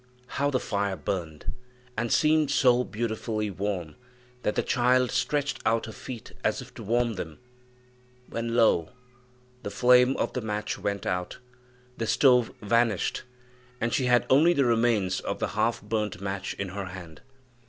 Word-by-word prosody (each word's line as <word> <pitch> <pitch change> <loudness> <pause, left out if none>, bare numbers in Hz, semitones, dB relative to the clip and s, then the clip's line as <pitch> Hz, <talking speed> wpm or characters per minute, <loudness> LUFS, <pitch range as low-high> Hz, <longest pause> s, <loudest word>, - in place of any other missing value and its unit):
How 140 +3 -1
the 130 -3 +1
fire 100 -3 -1
burned! 80 -1 -4 0.4
and 120 +1 -2
seemed 155 -2 +3
so 125 -3 +4
beautifully 110 -2 -3
warm 95 -5 -3 0.4
that 105 - -1
the - - +1
child 125 0 +2
stretched 140 +3 0
out 115 0 +1
her 110 - -7
feet 115 0 -8
as - - +1
if - - -10
to - - -10
warm 120 +2 +1
them, 80 -4 -6 0.9
when, 115 0 -3
lo! 110 -8 +3 0.7
the - - -4
flame 125 +4 +4
of - - -1
the 125 - -2
match 105 -1 -3
went 100 -1 -2
out, 90 -1 -2 0.6
the 115 - -2
stove 125 0 +4
vanished, 115 -1 +1 0.6
and 115 +1 -1
she 130 - +1
had 125 -1 +4
only 155 +6 +5
the 140 -5 +2
remains 115 -5 +2
of - - -3
the - - -2
half 115 -2 0
burnt 105 -3 -2
match 95 -1 -4
in 100 -1 -4
her 100 +1 -5
hand. 90 -4 -10
115 Hz, 160 wpm, -27 LUFS, 100-125 Hz, 0.9 s, only